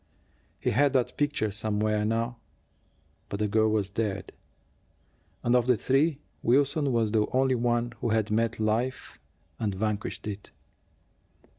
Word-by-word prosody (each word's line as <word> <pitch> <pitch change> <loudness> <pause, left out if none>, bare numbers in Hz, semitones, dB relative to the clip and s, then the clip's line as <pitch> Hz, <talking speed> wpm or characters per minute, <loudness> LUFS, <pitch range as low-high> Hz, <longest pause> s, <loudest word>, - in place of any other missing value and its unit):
He - - 0
had 140 +5 +3
that 130 -3 +1
picture 145 -7 0
somewhere 105 0 0
now; 115 +2 -1 0.9
but 100 - -3
the 105 0 0
girl 110 +1 +3
was 105 -2 0
dead, 100 -2 -2 1.1
and, 120 +1 +3
of 125 -1 +3
the 125 -2 +4
three, 140 +5 +2 0.2
Wilson 140 +3 +2
was 115 -3 +1
the 105 -1 +2
only 130 0 +3
one 120 0 0
who 120 - 0
had 110 -1 +1
met 115 +1 +1
life 115 +4 -1 0.4
and 105 -3 -1
vanquished 105 +2 -3
it. 105 -1 -6
115 Hz, 140 wpm, -28 LUFS, 105-125 Hz, 1.1 s, the